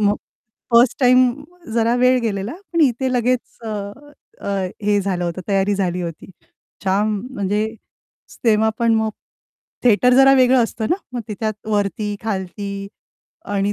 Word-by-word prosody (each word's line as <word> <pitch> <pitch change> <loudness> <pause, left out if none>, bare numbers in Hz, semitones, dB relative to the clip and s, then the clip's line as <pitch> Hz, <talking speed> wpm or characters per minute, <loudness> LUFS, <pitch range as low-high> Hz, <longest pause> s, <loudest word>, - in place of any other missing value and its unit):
मग 205 0 +2 0.6
1st 235 +1 +5
time 255 0 +6 0.5
जरा 230 0 +2
वेळ 255 +1 +4
गेलेला, 210 0 -2 0.2
पण 335 - +1
इथे 260 -2 +2
लगेच 250 0 -1
अ, - - -4 0.7
अ, - - -6 0.3
हे 205 0 +2
झालं 185 -3 -2
होतं. 170 +1 -3
तयारी 200 0 +2
झाली 180 -2 -1
होती. 165 -2 -6 0.6
जाम, 205 +3 +1 0.2
म्हणजे 205 +2 0 0.8
तेव्हा 220 -1 +4
पण 230 -1 +3
मग 220 0 +1 0.7
थिएटर 245 +2 +5
जरा 270 +1 +7
वेगळं 255 -1 +5
असतं 220 -1 -4
ना, 350 - +3 0.2
मग 245 - -3
तिच्यात 215 +1 -3
वरती, 205 0 -1
खालती 200 -1 -4 0.7
आणि 200 +1 +1
215 Hz, 140 wpm, -20 LUFS, 200-245 Hz, 0.8 s, जरा